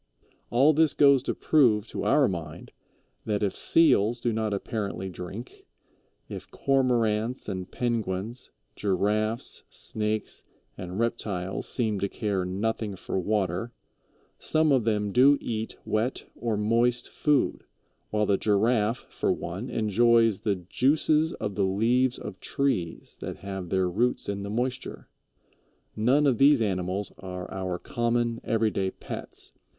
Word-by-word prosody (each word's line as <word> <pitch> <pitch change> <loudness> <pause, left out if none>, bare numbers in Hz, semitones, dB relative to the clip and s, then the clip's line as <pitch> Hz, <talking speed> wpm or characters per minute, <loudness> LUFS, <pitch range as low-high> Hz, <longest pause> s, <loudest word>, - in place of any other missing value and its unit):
All 135 +7 +5
this 155 0 +3
goes 140 -2 +6
to - - -3
prove 120 -8 +3
to - - -4
our 145 -3 +4
mind 85 -2 -6 0.5
that 105 -1 -1
if 100 - 0
Seals 120 -8 +3
do 120 -1 0
not 110 -1 -1
apparently 100 -2 -3
drink, 95 +7 -9 0.6
if - - -8
Cormorants 120 -3 +1
and 95 -3 -4
Penguins, 115 -1 -3 0.3
Giraffes, 105 +3 0
Snakes, 110 0 -3 0.3
and 90 0 -6
Reptiles 100 -5 -2
seem 110 -5 0
to 100 - -1
care 100 -4 -1
nothing 105 +2 -2
for 95 - -3
water, 100 +3 -1 0.7
some 155 -1 +2
of 130 -5 +3
them 105 -2 0
do 135 +6 +6
eat 110 -1 -4
wet 110 +4 -1
or 115 -3 -2
moist 120 +3 +1
food, 150 -3 +1 0.5
while 105 0 +1
the 100 -1 +2
Giraffe, 110 +2 +1
for - - -1
one, 95 +9 -4
enjoys 115 -1 +3
the 105 -2 +1
juices 150 - +2
of 105 - -4
the 100 - 0
leaves 120 +6 +2
of 95 - -8
trees 95 -12 -2
that - - -6
have 95 -3 -5
their 95 0 +1
roots 115 +8 0
in 100 0 -3
the 100 - -5
moisture. 125 +4 -3 0.9
None 130 +7 +3
of 130 -5 +2
these 140 0 +6
animals 95 -2 -1
are 90 -1 -7
our 95 -2 -3
common, 120 +2 -1
everyday 110 -4 +1
pets. - - -7
110 Hz, 135 wpm, -27 LUFS, 100-120 Hz, 0.9 s, goes